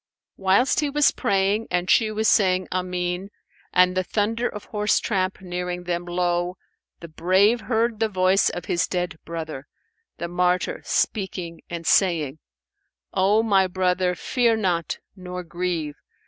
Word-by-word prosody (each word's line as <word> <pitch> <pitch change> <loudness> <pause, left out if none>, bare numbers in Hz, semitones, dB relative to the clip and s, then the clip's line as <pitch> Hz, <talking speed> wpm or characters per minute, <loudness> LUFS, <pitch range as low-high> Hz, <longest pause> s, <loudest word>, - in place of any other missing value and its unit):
Whilst 195 +7 +2
he 295 -2 0
was 295 0 +4
praying 200 +3 0
and 180 0 -1
she 220 +2 +4
was 215 +1 0
saying, 185 -3 +3
"Amen," 180 +1 -2 0.4
and 180 0 +4
the 185 - +1
thunder 225 +5 -1
of 210 - -8
horse 210 -1 +1
tramp 190 -3 -1
nearing 180 -1 -4
them, 175 0 -2
lo! 175 0 -1 0.4
the 170 - -8
brave 190 +8 +2
heard 230 -1 0
the 225 -1 +1
voice 185 0 +3
of 175 - -6
his 170 - 0
dead 180 -2 -3
brother, 160 -4 -6 0.5
the 170 - -4
martyr, 180 - 0
speaking 180 -5 -2
and 170 -1 -6
saying, 160 -6 +2 0.7
"O 200 +4 +3
my 195 -4 +3
brother, 180 0 0
fear 235 +1 +1
not, 175 -6 -1 0.2
nor 180 -1 -7
grieve! 170 -3 -3
185 Hz, 145 wpm, -24 LUFS, 175-205 Hz, 0.7 s, was